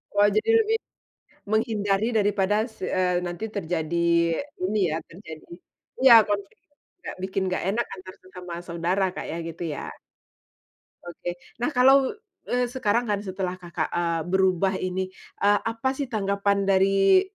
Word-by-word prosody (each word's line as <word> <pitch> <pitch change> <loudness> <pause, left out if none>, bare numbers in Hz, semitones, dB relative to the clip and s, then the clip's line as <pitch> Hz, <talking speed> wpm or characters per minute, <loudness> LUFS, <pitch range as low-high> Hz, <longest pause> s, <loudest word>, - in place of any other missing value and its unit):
Wah, 205 0 +5
jadi 215 - +1
lebih 445 +1 +1 0.7
menghindari 215 -2 +1
daripada 205 -1 +2
s 220 - -20
eee, 180 -1 0
nanti 175 +4 -5
terjadi 170 -3 -2 0.7
ini 215 - -1
ya, 155 - -1
terjadi 160 -3 -11 0.6
iya, 260 - +9
konflik 200 -1 -3 0.4
juga 355 - -10
bikin 190 +1 -2
nggak 185 - -2
enak 235 +3 0
antar 185 0 -11
sesama 180 -1 -10
saudara, 170 +3 0
Kak, - - -5
ya, 165 - -4
gitu 165 +1 -6
ya? - - -6 1.2
Oke, 175 0 -6 0.2
nah 245 - +1
kalau, 265 -1 +5 0.4
eee, 250 0 +1
sekarang 240 -2 0
kan 205 - +1
setelah 190 -2 -4
Kakak, 170 -2 -3
eee, 170 -1 0
berubah 190 0 +2
ini. 185 +1 -2 0.4
Eee, 205 0 +5
apa 230 +4 -2
sih 270 -2 -4
tanggapan 200 -2 0
dari 195 - +4
195 Hz, 140 wpm, -25 LUFS, 180-220 Hz, 1.2 s, iya